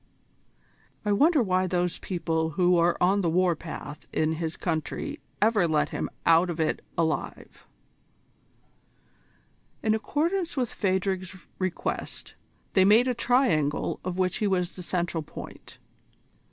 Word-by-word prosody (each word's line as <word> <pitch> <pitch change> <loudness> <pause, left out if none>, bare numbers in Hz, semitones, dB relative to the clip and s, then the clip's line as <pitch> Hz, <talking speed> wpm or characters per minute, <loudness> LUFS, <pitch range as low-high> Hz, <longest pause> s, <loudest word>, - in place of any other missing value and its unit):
I 210 - +1
wonder 290 +6 +4
why 185 -2 +1
those 180 -1 -1
people 165 -3 -1
who 180 -1 +4
are 170 0 +3
on 195 +3 +3
the 170 - +1
war 180 +1 +2
path 150 -2 -8
in 155 0 +1
his 160 0 -4
country 160 -4 -3 0.2
ever 210 -4 +3
let 155 -2 +1
him - - -3 0.2
out 165 +2 +5
of 170 -1 -4
it 160 - 0 0.2
alive?" 160 -2 -3 2.2
In 215 - +3
accordance 330 - -1
with 250 -3 -1
Phadrig's 190 -1 -2
request, 185 -2 -4 0.4
they 190 - +5
made 215 +6 +5
a 250 - +2
triangle 205 - +1
of 185 0 -4
which 185 -1 +1
he 210 - 0
was 180 -2 0
the 185 - -7
central 175 -2 -2
point. 150 - -10
185 Hz, 135 wpm, -27 LUFS, 165-205 Hz, 2.2 s, out